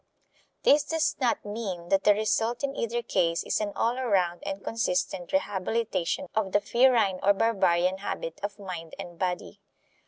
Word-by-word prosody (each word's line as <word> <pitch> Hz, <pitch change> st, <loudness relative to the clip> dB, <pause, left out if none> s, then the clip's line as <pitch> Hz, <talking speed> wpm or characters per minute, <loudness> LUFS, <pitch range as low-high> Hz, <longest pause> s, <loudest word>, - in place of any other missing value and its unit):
This 290 Hz, +1 st, +5 dB
does 320 Hz, +2 st, 0 dB
not 245 Hz, -4 st, +1 dB
mean 200 Hz, -5 st, -5 dB
that 195 Hz, 0 st, +2 dB
the 205 Hz, -, +6 dB
result 225 Hz, +4 st, 0 dB
in 275 Hz, 0 st, -1 dB
either 235 Hz, +1 st, -2 dB
case 170 Hz, -5 st, +1 dB
is -, -, -1 dB
an 205 Hz, -1 st, -2 dB
all 240 Hz, +3 st, 0 dB
around 185 Hz, -8 st, +1 dB
and 195 Hz, 0 st, -4 dB
consistent 180 Hz, -5 st, -1 dB
rehabilitation 195 Hz, +4 st, -1 dB
of 205 Hz, -3 st, -1 dB
the 205 Hz, -, +5 dB
ferine 235 Hz, -5 st, +3 dB
or 200 Hz, +1 st, +5 dB
barbarian 190 Hz, -4 st, +2 dB
habit -, -, -5 dB
of 205 Hz, 0 st, -4 dB
mind 180 Hz, -5 st, -7 dB
and 175 Hz, -1 st, -9 dB
body. 185 Hz, +2 st, -3 dB
205 Hz, 160 wpm, -27 LUFS, 185-230 Hz, -, the